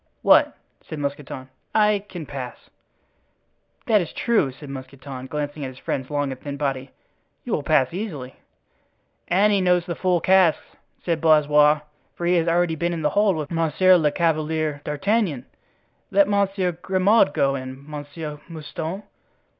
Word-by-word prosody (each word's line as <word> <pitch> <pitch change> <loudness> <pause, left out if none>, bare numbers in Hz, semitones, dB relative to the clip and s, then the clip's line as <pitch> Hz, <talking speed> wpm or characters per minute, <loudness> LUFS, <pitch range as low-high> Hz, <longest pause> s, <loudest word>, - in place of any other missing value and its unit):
"What?" - - +5 0.2
said 155 - -8
Mousqueton. 140 -2 -5 0.3
"I 210 -2 +3
can 175 -4 -7
pass." 130 -4 -8 1.1
"That 215 -3 +4
is 170 - -5
true," 220 - +1
said 145 +3 -12
Mousqueton, 130 0 -8
glancing 145 +1 -4
at - - -3
his 130 - -13
friend's 130 0 -4
long 145 -2 -1
and 130 - -8
thin 140 -1 -6
body, 135 -2 -2 0.5
"you - - -4
will - - 0
pass 130 +4 +2
easily." 155 - -5 0.9
"And 205 +4 +3
he 200 - +2
knows 180 -1 +2
the 175 - -3
full 180 0 +1
casks," 185 -1 +3 0.4
said 165 -3 0
Blaisois, 150 -1 +5 0.3
"for 175 - -4
he 175 - +3
has 165 0 +1
already 170 0 +2
been 170 +3 -1
in 165 -2 -4
the 150 - +2
hold 205 -2 +3
with 155 -1 -5
Monsieur 165 +3 +4
le 155 -4 +3
Chevalier 155 -2 0
d'Artagnan. 155 - 0 0.6
Let 200 0 +4
Monsieur 195 -2 +1
Grimaud 185 +3 +2
go 135 -1 +1
in, 130 +1 -7
Monsieur 150 0 -7
Mouston." 165 +4 -6
155 Hz, 155 wpm, -23 LUFS, 145-180 Hz, 1.1 s, What